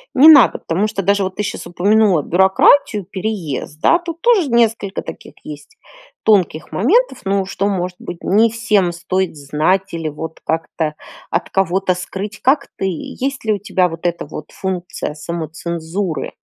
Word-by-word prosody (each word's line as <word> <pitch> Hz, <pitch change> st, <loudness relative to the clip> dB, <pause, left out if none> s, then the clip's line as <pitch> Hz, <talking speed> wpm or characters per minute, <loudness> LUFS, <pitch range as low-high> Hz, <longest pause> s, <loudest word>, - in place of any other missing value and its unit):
не 275 Hz, +4 st, +8 dB
надо? 290 Hz, -6 st, +8 dB
Потому 190 Hz, +6 st, -1 dB
что 195 Hz, -2 st, -3 dB
даже 200 Hz, +2 st, +2 dB
вот 185 Hz, -1 st, -2 dB
ты 210 Hz, -, -2 dB
щас 205 Hz, -, -5 dB
упомянула 190 Hz, -2 st, +3 dB
бюрократию, 190 Hz, +3 st, +3 dB
переезд, 185 Hz, -7 st, -4 dB
да, 340 Hz, -, +4 dB
тут 335 Hz, -1 st, -7 dB
тоже 440 Hz, -10 st, +3 dB
несколько 225 Hz, -4 st, +1 dB
таких -, -, -10 dB
есть 150 Hz, -1 st, -11 dB, 0.5 s
тонких 185 Hz, -7 st, +2 dB
моментов, 335 Hz, -, +2 dB
ну, 195 Hz, 0 st, +1 dB
что, 195 Hz, +1 st, -2 dB
может 180 Hz, -2 st, -2 dB
быть, 170 Hz, -, -8 dB
не 220 Hz, +4 st, +4 dB
всем 215 Hz, -5 st, +1 dB
стоит 185 Hz, 0 st, -2 dB
знать 155 Hz, +8 st, 0 dB
или 165 Hz, -2 st, -3 dB
вот 160 Hz, +2 st, -7 dB
как-то 160 Hz, -1 st, -2 dB, 0.3 s
от 170 Hz, -, -2 dB
кого-то 190 Hz, 0 st, +1 dB
скрыть. 195 Hz, +3 st, -6 dB
Как 270 Hz, +4 st, +2 dB
ты? 195 Hz, -, -2 dB
Есть 250 Hz, -, -4 dB
ли 215 Hz, -, +2 dB
у 205 Hz, -, -3 dB
тебя 185 Hz, -3 st, +1 dB
вот 165 Hz, +1 st, -4 dB
эта 170 Hz, 0 st, -3 dB
вот 150 Hz, 0 st, -9 dB
функция 180 Hz, -5 st, -4 dB
самоцензуры? 165 Hz, +2 st, -4 dB
190 Hz, 160 wpm, -18 LUFS, 170-215 Hz, 0.5 s, не